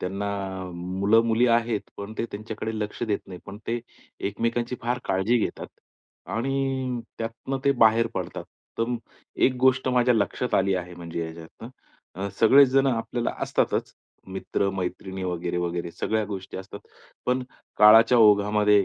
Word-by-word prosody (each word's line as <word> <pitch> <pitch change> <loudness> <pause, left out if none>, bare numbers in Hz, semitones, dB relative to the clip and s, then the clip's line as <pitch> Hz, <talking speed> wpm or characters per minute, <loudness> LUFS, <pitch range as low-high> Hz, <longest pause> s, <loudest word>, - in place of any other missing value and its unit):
त्यांना 100 +2 -3 0.5
मुलं-मुली 105 +7 +2
आहेत, 115 -2 +2 0.2
पण 100 +2 -7
ते - - 0
त्यांच्याकडे 110 +1 -5
लक्ष 105 +1 -4
देत 105 -3 0
नाही. 90 -2 -9
पण 100 +1 -8
ते 120 +1 -1 0.5
एकमेकांची 115 +4 -2
फार 120 +1 0
काळजी 95 +6 +2
घेतात. - - -3 0.6
आणि 130 0 -1 0.2
त्यातनं 115 +4 -4
ते 140 - +5
बाहेर 115 +1 +5
पडतात. - - -4 0.3
तर 115 - +2
मग 120 -1 -1 0.5
एक 130 - 0
गोष्ट 130 0 +3
माझ्या 125 -1 +3
लक्षात 115 +3 0
आली 95 0 +3
आहे 90 -1 -4
म्हणजे 85 -1 -6
याच्यातनं, 80 +7 -10 0.5
अ, 100 +2 -3
सगळे 135 +5 +8
जण 135 +1 +3
आपल्याला 115 0 -1
असतातच, - - 0 0.3
मित्र-मैत्रिणी 95 0 -3
वगैरे-वगैरे 85 -1 -2
सगळ्या 110 -1 -1
गोष्टी 95 -2 -6
असतात. 95 +2 -8 0.5
पण 125 +1 +1 0.4
काळाच्या 115 +3 +8
ओघामध्ये 105 -1 +5
110 Hz, 135 wpm, -25 LUFS, 95-120 Hz, 0.6 s, सगळे